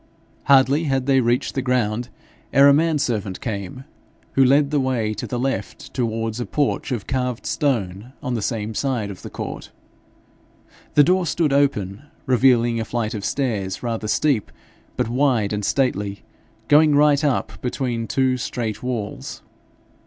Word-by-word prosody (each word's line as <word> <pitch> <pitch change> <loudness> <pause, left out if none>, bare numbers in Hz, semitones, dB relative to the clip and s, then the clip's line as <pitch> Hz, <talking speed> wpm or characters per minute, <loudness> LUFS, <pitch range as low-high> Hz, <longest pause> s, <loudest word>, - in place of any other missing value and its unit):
Hardly 140 +3 +4
had 135 -3 0
they 135 -1 +4
reached 120 +3 0
the 135 - -1
ground 125 -2 0 0.4
ere 140 0 +6
a 140 - +7
man 160 +1 +2
servant 105 -8 -2
came, 105 +2 -5 0.5
who 135 - +4
led 140 +2 +4
the 150 - +2
way 125 -5 0
to 105 - -5
the 125 - -3
left 135 +2 -4
towards 115 -2 -2
a 120 - -3
porch 145 -2 -1
of 115 -6 -3
carved 125 -2 -2
stone 110 -5 -1
on 125 -3 -2
the 115 - -1
same 110 0 -2
side 120 -4 -1
of 95 - -10
the - - -8
court. - - -6 1.3
The 145 - +7
door 180 +2 +2
stood 155 -2 +1
open, 110 -8 +1 0.2
revealing 120 -3 +3
a - - -1
flight 115 -1 -2
of 105 -3 -5
stairs, 105 -9 -2
rather 115 -2 -3
steep, 115 0 +1 0.5
but - - 0
wide 120 -4 +1
and 105 0 -2
stately, 100 -5 -1 0.4
going 150 0 +5
right 145 0 +4
up 145 -4 -1
between 120 -2 -2
two 130 0 +1
straight 115 -3 -4
walls. 120 -5 -5
125 Hz, 160 wpm, -22 LUFS, 110-140 Hz, 1.3 s, a